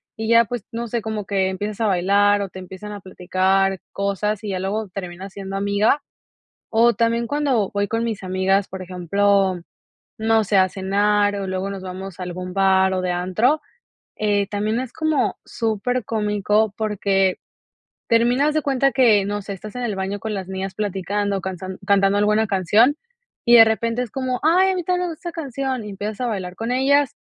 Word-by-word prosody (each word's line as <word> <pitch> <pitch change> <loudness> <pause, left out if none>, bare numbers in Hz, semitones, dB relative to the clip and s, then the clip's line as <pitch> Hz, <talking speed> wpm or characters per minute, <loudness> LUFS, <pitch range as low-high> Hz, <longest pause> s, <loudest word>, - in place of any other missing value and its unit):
y 220 0 -4
ya 230 0 +6
pues 240 -1 -5
no 235 +1 -4
sé, 235 +1 -2
como 215 -1 -4
que 190 -1 +1
empiezas 205 +3 -4
a 220 - +2
bailar 200 +2 +3
o 200 - -3
te 185 - -10
empiezan 190 +3 -9
a 205 - -6
platicar 190 +1 0
cosas 200 +2 -2
y 210 - -4
ya 190 -2 -2
luego 205 +3 -2
termina 185 0 -7
siendo 195 0 -7
amiga. 205 +7 +1 0.7
O 235 +2 +4
también 230 0 +1
cuando 275 -9 +1
voy 205 0 0
con 225 +2 -1
mis 220 -4 -3
amigas, 190 +1 +1
por 190 0 -7
ejemplo, 185 +1 +1 0.6
no 220 0 +3
sé, 200 0 +1
a 185 0 +4
cenar 205 +2 +1
o 195 -1 -4
luego 190 +1 -2
nos 195 -1 -6
vamos 185 0 -7
a - - -3
algún 180 0 -6
bar 190 0 +3
o 185 - -1
de 185 - -2
antro, 185 - +1 0.6
eh, 205 -2 +1
también 210 +3 -1
es 255 -1 -5
como 315 -2 0
supercómico 215 -2 0
porque 195 -3 +1 0.7
termina 240 +4 +3
haz 305 - -1
de 310 - +1
cuenta 275 -1 +2
que 225 -7 +4
no 205 0 -3
sé, 200 - -6
estás 205 +2 -9
en 250 - -4
el 220 -5 -2
baño 190 +1 -3
con 220 +1 -4
las 190 -3 -4
niñas 190 0 -4
platicando, 200 0 -2
cansan 185 0 -6
cantando 200 0 +3
alguna 210 +2 +2
canción 205 - +3 0.5
y 240 0 +7
de 225 - +10
repente 230 +2 0
es 245 - -6
como: 255 -1 -2
"Ay, 360 +5 +4
a - - 0
mí 360 -2 -3
tambièn 360 +1 0
me - - -4
gusta 345 - -8
esa - - -18
canción" 270 -6 -3
y 210 - -7
empiezas 205 +2 -5
a - - 0
bailar 185 -5 -4
con 230 +2 -3
ellas 275 +2 +2
205 Hz, 195 wpm, -21 LUFS, 190-230 Hz, 0.7 s, de